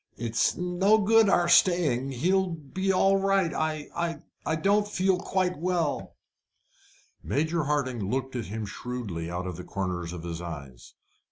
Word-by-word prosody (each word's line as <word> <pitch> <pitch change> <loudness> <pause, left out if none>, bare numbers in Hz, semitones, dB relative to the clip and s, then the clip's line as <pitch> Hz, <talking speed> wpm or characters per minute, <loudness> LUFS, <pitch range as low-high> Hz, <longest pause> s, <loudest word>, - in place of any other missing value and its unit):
"It's 115 -1 +1
no 180 +4 +3
good 220 0 +4
our 175 -2 +3
staying. 170 -8 +3
He'll 185 +9 +1
be 170 +4 -2
all 195 +1 +4
right. 195 -4 +2
I 155 +2 -2 0.3
I 160 - 0
don't 200 +6 +2
feel 190 -2 +1
quite 185 -3 -1
well." 170 -3 -1 1.1
Major 160 +2 0
Hardinge 135 -5 -1
looked 130 +6 -2
at 120 -3 -3
him 110 +2 -5
shrewdly 105 -7 -5
out 90 +1 -4
of 90 -3 -5
the 90 - -7
corner 90 -2 -3
of 85 0 -6
his 85 -1 -5
eyes. 70 -8 -9
155 Hz, 150 wpm, -27 LUFS, 110-185 Hz, 1.1 s, good